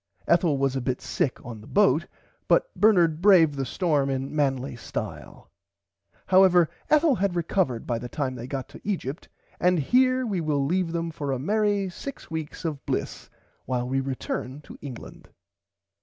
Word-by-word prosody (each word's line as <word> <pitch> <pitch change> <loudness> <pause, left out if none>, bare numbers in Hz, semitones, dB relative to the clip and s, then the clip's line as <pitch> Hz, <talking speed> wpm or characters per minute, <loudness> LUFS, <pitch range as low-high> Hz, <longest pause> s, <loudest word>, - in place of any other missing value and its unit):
Ethel 170 -4 +3
was 135 -1 0
a 135 - -1
bit 125 0 -2
sick 130 - -1
on 115 -4 -8
the 105 - -14
boat 170 -5 +3 0.4
but - - +2
Bernard 175 -7 +3
braved 180 -6 +6
the 135 -2 -3
storm 145 -3 +1
in 135 +2 -3
manly 135 -3 0
style. 115 - -7 0.7
However 185 -3 +5 0.2
Ethel 305 0 +4
had 200 -5 0
recovered 170 - 0
by 120 -2 -1
the 120 - -7
time 135 -2 -2
they 125 -1 -7
got 135 -1 -4
to - - -13
Egypt 175 -7 -4 0.3
and 180 0 +3
here 255 - +3
we 195 -6 -1
will 145 -3 0
leave 175 +2 0
them 165 0 -2
for 145 -3 -4
a 135 - 0
merry 205 - +1
six 265 +4 -8
weeks 160 +1 -5
of 150 -4 -3
bliss - - -3 0.4
while 125 -1 -2
we 135 +1 0
return 135 +1 -4
to - - -12
England. 135 -5 -10
155 Hz, 170 wpm, -26 LUFS, 135-185 Hz, 0.7 s, braved